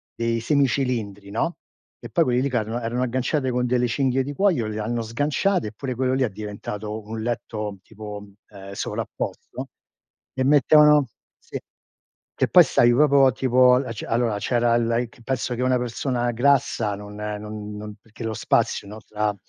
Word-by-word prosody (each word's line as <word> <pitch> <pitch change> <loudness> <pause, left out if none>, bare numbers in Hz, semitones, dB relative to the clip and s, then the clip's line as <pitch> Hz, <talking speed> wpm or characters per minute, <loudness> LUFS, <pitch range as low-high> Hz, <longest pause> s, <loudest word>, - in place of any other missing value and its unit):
dei 115 0 0
semi 140 +3 +3
cilindri, 110 -7 -2
no, 165 +11 -1 0.4
e 120 - -9
poi 165 +9 +3
quelli 125 -1 +2
lì 140 - 0
ca 120 -3 +1
era 115 +3 -4
erano 120 +2 -1
agganciate 130 +2 0
con 125 0 0
delle 125 0 +1
cinghie 130 +1 +1
di 145 - -5
cuoio, 170 - +2
le 110 0 -4
hanno 115 +2 -2
sganciate, 145 - 0
e - - -6
pure 130 +2 -5
quello 130 +1 0
lì 130 0 +2
è 120 - +1
diventato 105 +1 -6
un 110 0 -5
letto 105 -4 -3
tipo, 105 -1 -9 0.2
ehm, 100 -1 -10
sovrapposto - - -5 0.6
e 130 - -1
mettevano, 150 +1 +6 0.3
sì, - - -7 0.8
che - - +1
poi - - +8
stavi 120 0 +4
proprio 140 +1 +5
a - - +4
tipo, 125 0 +4
al 125 -2 -1
ce 110 - -7
allora 115 -3 +1
c'era 120 +1 +2
il 115 0 +1
a 115 - +2
ic 120 0 -6
penso 125 -1 -2
che 125 - -4
una 130 0 +3
persona 120 0 -1
grassa 120 -4 +2
non 105 0 -10
non 105 0 -6
non 105 0 -8
perché 115 +1 -11
lo 110 - -2
spazio 110 -1 0
no, 105 +2 -9
tra 105 -1 -1
120 Hz, 185 wpm, -23 LUFS, 105-130 Hz, 0.8 s, poi